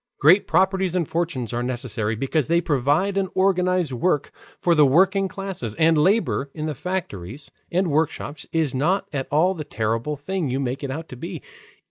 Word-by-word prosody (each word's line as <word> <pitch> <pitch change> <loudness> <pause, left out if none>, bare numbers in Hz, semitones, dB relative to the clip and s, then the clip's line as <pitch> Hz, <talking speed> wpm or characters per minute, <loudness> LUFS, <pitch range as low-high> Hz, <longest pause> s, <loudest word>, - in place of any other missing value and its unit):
Great 185 +7 +5
properties 190 -2 +2
and 170 -4 0
fortunes 160 -9 -2
are 120 - -1
necessary, 120 -3 -2
because 135 +5 0
they 170 +1 +3
provide 155 +6 +1
and 190 -1 -1
organize 185 -5 +2
work 145 +3 0 0.3
for 175 - +3
the 155 -2 +5
working 190 +7 +4
classes. 190 - -5
And 165 0 +4
labor 155 -3 +2
in 155 -1 -4
the 155 - -2
factories 140 - -5 0.2
and 180 -1 +1
workshops 145 -1 -2
is 160 -4 0
not 170 +9 +1
at 135 -2 -2
all 165 +6 +3
the 160 -5 -6
terrible 115 +3 -2
thing 160 +2 -3
you 130 +2 -1
make 130 +1 -3
it 140 - -3
out 160 +5 -5
to - - -8
be. 165 +8 -7
155 Hz, 180 wpm, -23 LUFS, 135-185 Hz, 0.3 s, Great